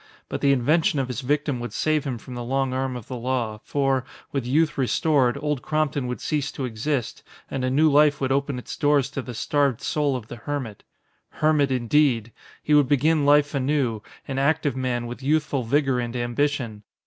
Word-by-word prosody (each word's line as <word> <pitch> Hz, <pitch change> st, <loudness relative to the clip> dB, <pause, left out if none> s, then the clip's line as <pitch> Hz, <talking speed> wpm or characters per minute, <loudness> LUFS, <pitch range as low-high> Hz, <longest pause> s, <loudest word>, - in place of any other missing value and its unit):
But -, -, -4 dB
the 140 Hz, -, +4 dB
invention 150 Hz, +5 st, +2 dB
of 130 Hz, -2 st, -1 dB
his 125 Hz, +1 st, -3 dB
victim 145 Hz, 0 st, 0 dB
would 120 Hz, 0 st, -6 dB
save 155 Hz, -2 st, 0 dB
him 130 Hz, -4 st, -2 dB
from 125 Hz, +3 st, -10 dB
the 120 Hz, 0 st, -5 dB
long 135 Hz, +1 st, -1 dB
arm 130 Hz, 0 st, -2 dB
of 120 Hz, -3 st, -8 dB
the 130 Hz, -, -5 dB
law, 120 Hz, -3 st, -2 dB
for, 135 Hz, -2 st, 0 dB, 0.3 s
with 135 Hz, -4 st, -2 dB
youth 155 Hz, +5 st, +2 dB
restored, 135 Hz, -1 st, +2 dB
Old 150 Hz, -3 st, -2 dB
Crompton 150 Hz, -4 st, -1 dB
would 125 Hz, -, -4 dB
cease 145 Hz, -2 st, -1 dB
to 135 Hz, -, -3 dB
exist 125 Hz, +2 st, -2 dB, 0.3 s
and 135 Hz, -1 st, -2 dB
a 130 Hz, -, +1 dB
new 150 Hz, +5 st, +4 dB
life 150 Hz, 0 st, +4 dB
would 135 Hz, -1 st, -1 dB
open 140 Hz, 0 st, 0 dB
its 125 Hz, -, -7 dB
doors 145 Hz, -2 st, +2 dB
to 140 Hz, -, -3 dB
the 125 Hz, -2 st, -8 dB
starved 140 Hz, 0 st, +1 dB
soul 145 Hz, 0 st, 0 dB
of 125 Hz, -4 st, -5 dB
the 120 Hz, -, -8 dB
hermit. 120 Hz, -4 st, -5 dB, 0.5 s
Hermit, 155 Hz, -2 st, +2 dB
indeed! 125 Hz, -2 st, +2 dB, 0.3 s
He 150 Hz, -, +1 dB
would 145 Hz, -2 st, +5 dB
begin 145 Hz, +2 st, +2 dB
life 145 Hz, 0 st, +4 dB
anew, 135 Hz, -5 st, 0 dB, 0.3 s
an 135 Hz, -1 st, -2 dB
active 145 Hz, -1 st, +1 dB
man 125 Hz, -2 st, -1 dB
with 120 Hz, +2 st, -7 dB
youthful 150 Hz, -1 st, +1 dB
vigor 135 Hz, +1 st, +1 dB
and 120 Hz, 0 st, -4 dB
ambition. 120 Hz, -2 st, -1 dB
135 Hz, 195 wpm, -24 LUFS, 125-145 Hz, 0.5 s, would